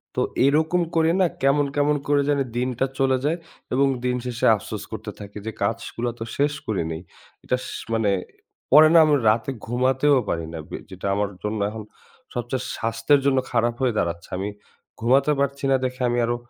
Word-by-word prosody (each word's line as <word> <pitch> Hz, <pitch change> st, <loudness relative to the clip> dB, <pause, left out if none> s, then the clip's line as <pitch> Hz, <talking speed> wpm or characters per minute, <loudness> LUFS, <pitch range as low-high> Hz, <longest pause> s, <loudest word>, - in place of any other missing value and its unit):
তো -, -, +1 dB, 0.2 s
এরকম 160 Hz, +5 st, +3 dB
করে 165 Hz, 0 st, +4 dB
না, -, -, +5 dB, 0.2 s
কেমন, 145 Hz, +1 st, +4 dB
কেমন, 145 Hz, +1 st, +3 dB
করে 145 Hz, 0 st, +3 dB
জানি 140 Hz, -1 st, +2 dB
দিনটা 125 Hz, +1 st, 0 dB
চলে 130 Hz, -1 st, +3 dB
যায় 160 Hz, +4 st, +1 dB, 0.4 s
এবং 140 Hz, +1 st, +4 dB, 0.2 s
দিন 125 Hz, -, +1 dB
শেষে 125 Hz, -2 st, -2 dB
আফসোস 105 Hz, +1 st, -6 dB
করতে 110 Hz, -1 st, -6 dB
থাকি, 100 Hz, 0 st, -9 dB
যে 110 Hz, -, -3 dB
কাজগুলা 115 Hz, +3 st, -2 dB
তো 115 Hz, -, -3 dB
শেষ 145 Hz, +1 st, +2 dB
করিনি। 80 Hz, -6 st, -2 dB, 0.5 s
এটাস 125 Hz, 0 st, -1 dB, 0.3 s
মানে 110 Hz, -3 st, +2 dB, 0.6 s
পরে 155 Hz, +3 st, +9 dB
না -, -, +8 dB
আমি 150 Hz, -, +4 dB
রাতে 110 Hz, +4 st, +1 dB, 0.2 s
ঘুমাতেও 130 Hz, +3 st, +3 dB
পারি 85 Hz, -1 st, -1 dB
না। 80 Hz, -, -5 dB
বে -, -, -5 dB
যেটা 95 Hz, +1 st, -6 dB
আমার 100 Hz, 0 st, 0 dB
জন্য 105 Hz, 0 st, -2 dB
এখন 110 Hz, 0 st, -7 dB, 0.5 s
সবচেয়ে 125 Hz, +1 st, -3 dB
স্বাস্থ্যের 115 Hz, +5 st, +2 dB
জন্য 135 Hz, -1 st, +3 dB
খারাপ 120 Hz, 0 st, +2 dB
হয়ে 125 Hz, -3 st, +2 dB
দাঁড়াচ্ছে। 85 Hz, 0 st, -2 dB
আমি 100 Hz, +2 st, -2 dB, 0.5 s
ঘুমাতে 135 Hz, +6 st, +3 dB
পারছি 140 Hz, 0 st, -1 dB
না -, -, +5 dB
দেখে 130 Hz, +1 st, -4 dB
আমি 120 Hz, -, 0 dB
আরো 120 Hz, +1 st, 0 dB
125 Hz, 180 wpm, -23 LUFS, 110-140 Hz, 0.6 s, পরে